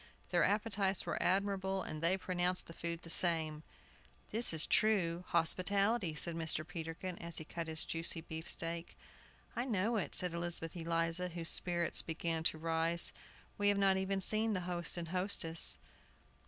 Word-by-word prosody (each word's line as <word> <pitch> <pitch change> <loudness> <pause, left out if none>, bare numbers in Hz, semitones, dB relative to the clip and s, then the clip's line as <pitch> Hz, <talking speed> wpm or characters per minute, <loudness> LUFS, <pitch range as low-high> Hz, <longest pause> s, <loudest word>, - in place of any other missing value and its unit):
Their - - +3
appetites 205 -2 +1
were - - -2
admirable, 195 0 0
and 155 - -5
they 170 +3 +3
pronounced 180 -1 -1
the 165 - -11
food 170 0 -5
the 165 - -10
same. 160 -3 +1 0.7
"This 230 +3 +3
is 160 -2 +2
true 205 -6 +2
Arab 175 +2 -8
hospitality," 185 +2 +2
said 170 +2 -1
Mr. 160 -1 -2
Peterkin, 170 +1 -6
as 170 -1 -6
he 155 - -5
cut 165 +1 -5
his 160 0 -2
juicy 165 0 +2
beefsteak. 165 +1 -4 0.6
"I 240 - -1
know 225 -2 0
it," 205 - -3
said 180 -2 0
Elizabeth 170 -1 -2
Eliza, 165 +1 -1
whose 170 -1 -1
spirits 175 -1 +5
began 165 0 -2
to 160 - +2
rise. 165 +1 +1 0.5
"We 205 - +3
have 205 0 +4
not 195 -1 +4
even 190 0 -1
seen 215 +3 +3
the 185 - -1
host 175 -1 -1
and 170 -2 -5
hostess." 180 -3 +1
175 Hz, 165 wpm, -35 LUFS, 165-190 Hz, 0.7 s, spirits